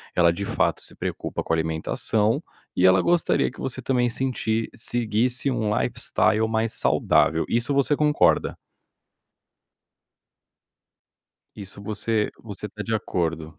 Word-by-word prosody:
ela 85 Hz, -1 st, +4 dB
de 100 Hz, -, -4 dB
fato -, -, 0 dB
se -, -, -6 dB
preocupa -, -, -4 dB
com 80 Hz, -, -1 dB
a -, -, +4 dB
alimentação 80 Hz, +7 st, 0 dB, 0.3 s
e 90 Hz, -, +3 dB
ela 95 Hz, 0 st, +6 dB
gostaria 175 Hz, -1 st, +2 dB
que -, -, -16 dB
você 130 Hz, 0 st, -4 dB
também 125 Hz, -1 st, +1 dB
sentir 115 Hz, -3 st, -1 dB
seguisse 120 Hz, +3 st, 0 dB
um 110 Hz, -4 st, -1 dB
lifestyle 110 Hz, -2 st, +1 dB
mais 110 Hz, 0 st, -1 dB
saudável, 80 Hz, 0 st, +2 dB
isso 120 Hz, +5 st, +1 dB
você 140 Hz, +1 st, +2 dB
concorda? 150 Hz, 0 st, +2 dB, 3.0 s
Isso 100 Hz, -1 st, -9 dB
você 105 Hz, +1 st, -1 dB
você 105 Hz, -2 st, -7 dB
tá 105 Hz, +2 st, -7 dB
de 115 Hz, 0 st, -2 dB
acordo? 80 Hz, -6 st, -3 dB
110 Hz, 130 wpm, -24 LUFS, 95-120 Hz, 3.0 s, ela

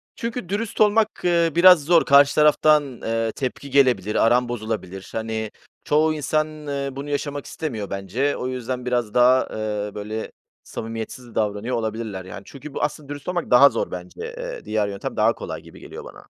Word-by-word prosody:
Çünkü 230 Hz, -5 st, -5 dB
dürüst 210 Hz, +2 st, -2 dB
olmak, 215 Hz, +1 st, +4 dB
eee, 170 Hz, -2 st, +3 dB
biraz 180 Hz, -2 st, +7 dB
zor. 165 Hz, +2 st, +4 dB
Karşı 140 Hz, 0 st, +6 dB
taraftan, 150 Hz, -3 st, +3 dB
eee, 115 Hz, 0 st, -1 dB
tepki 135 Hz, +3 st, -5 dB
gelebilir, 125 Hz, -7 st, +3 dB
aran 120 Hz, +1 st, +3 dB
bozulabilir. 110 Hz, -5 st, -5 dB
Hani, 110 Hz, -1 st, -3 dB, 0.3 s
çoğu 155 Hz, +1 st, +2 dB
insan, 155 Hz, 0 st, -2 dB
eee, 140 Hz, -1 st, -2 dB
bunu 140 Hz, +2 st, -7 dB
yaşamak 145 Hz, 0 st, -3 dB
istemiyor 115 Hz, -11 st, -5 dB
bence 100 Hz, +9 st, -1 dB
o 125 Hz, -, -3 dB
yüzden 125 Hz, 0 st, -4 dB
biraz 120 Hz, -4 st, -1 dB
daha, 125 Hz, +1 st, +4 dB
eee, 105 Hz, -1 st, -3 dB
böyle, 105 Hz, +2 st, -5 dB, 0.3 s
samimiyetsiz 115 Hz, +2 st, -7 dB
davranıyor 105 Hz, +3 st, -1 dB
olabilirler, 110 Hz, -4 st, -4 dB
yani, 95 Hz, +1 st, -8 dB
çünkü 140 Hz, +1 st, -11 dB
bu -, -, -4 dB
aslında 150 Hz, -1 st, -3 dB
dürüst 145 Hz, -1 st, -8 dB
olmak 180 Hz, -1 st, -3 dB
daha 130 Hz, +3 st, +8 dB
zor -, -, -3 dB
bence, -, -, -8 dB, 0.2 s
eee, -, -, -6 dB
diğer 105 Hz, -1 st, 0 dB
yöntem 100 Hz, -1 st, -5 dB
daha -, -, +4 dB
kolay -, -, -7 dB
gibi -, -, -15 dB
geliyor -, -, -10 dB
bana. -, -, -13 dB
130 Hz, 170 wpm, -23 LUFS, 110-150 Hz, 0.3 s, daha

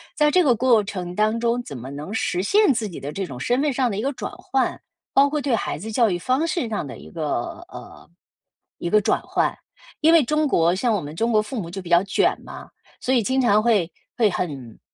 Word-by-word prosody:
在 300 Hz, -1 st, +3 dB
这 365 Hz, -, +4 dB
个 270 Hz, -8 st, +4 dB
过 235 Hz, -2 st, +4 dB
程 185 Hz, -3 st, -5 dB
当 215 Hz, +4 st, +1 dB
中， 235 Hz, +1 st, +1 dB
怎 140 Hz, -, -8 dB
么 125 Hz, +3 st, -8 dB
能 150 Hz, +8 st, -7 dB
实 180 Hz, -5 st, -1 dB
现 400 Hz, -, +4 dB
自 225 Hz, -3 st, -2 dB
己 175 Hz, -, -9 dB
的 140 Hz, -, -5 dB
这 195 Hz, +5 st, -3 dB
种 130 Hz, -7 st, -8 dB
身 245 Hz, -, 0 dB
份 295 Hz, -2 st, +1 dB
上 250 Hz, -2 st, +1 dB
的 195 Hz, -, -3 dB
一 210 Hz, -, -1 dB
个 275 Hz, +3 st, -1 dB
转 -, -, -6 dB
换？ 265 Hz, 0 st, -1 dB, 0.3 s
包 280 Hz, +1 st, +5 dB
括 300 Hz, 0 st, -1 dB
对 270 Hz, -4 st, 0 dB
孩 -, -, -3 dB
子 215 Hz, +8 st, -7 dB
教 225 Hz, 0 st, +3 dB
育 175 Hz, -, -1 dB
方 260 Hz, -, 0 dB
式 320 Hz, -7 st, -2 dB
上 205 Hz, -9 st, -3 dB
的 -, -, -8 dB
一 75 Hz, +2 st, -13 dB
个 -, -, -3 dB
呃， 75 Hz, -, -12 dB, 0.7 s
一 170 Hz, -, -3 dB
个 215 Hz, +3 st, +4 dB
转 -, -, +1 dB
换， -, -, 0 dB, 0.5 s
因 320 Hz, +2 st, +5 dB
为 330 Hz, -4 st, +6 dB
中 305 Hz, +4 st, +1 dB
国 170 Hz, -8 st, +3 dB
像 230 Hz, +4 st, +1 dB
我 205 Hz, -, 0 dB
们 145 Hz, +1 st, -7 dB
中 230 Hz, +1 st, +1 dB
国 215 Hz, -, +4 dB
父 215 Hz, +3 st, -5 dB
母 170 Hz, -, -5 dB
就 195 Hz, +2 st, -6 dB
比 175 Hz, -, -10 dB
较 175 Hz, +1 st, +5 dB
卷 195 Hz, -, +1 dB
嘛， -, -, -10 dB, 0.3 s
所 260 Hz, -, 0 dB
以 245 Hz, -, +4 dB
经 260 Hz, +5 st, +1 dB
常 215 Hz, -4 st, +4 dB
会 210 Hz, -7 st, +2 dB, 0.3 s
会 220 Hz, -3 st, +4 dB
很 135 Hz, -, -5 dB
215 Hz, 265 characters per minute, -23 LUFS, 175-260 Hz, 0.7 s, 为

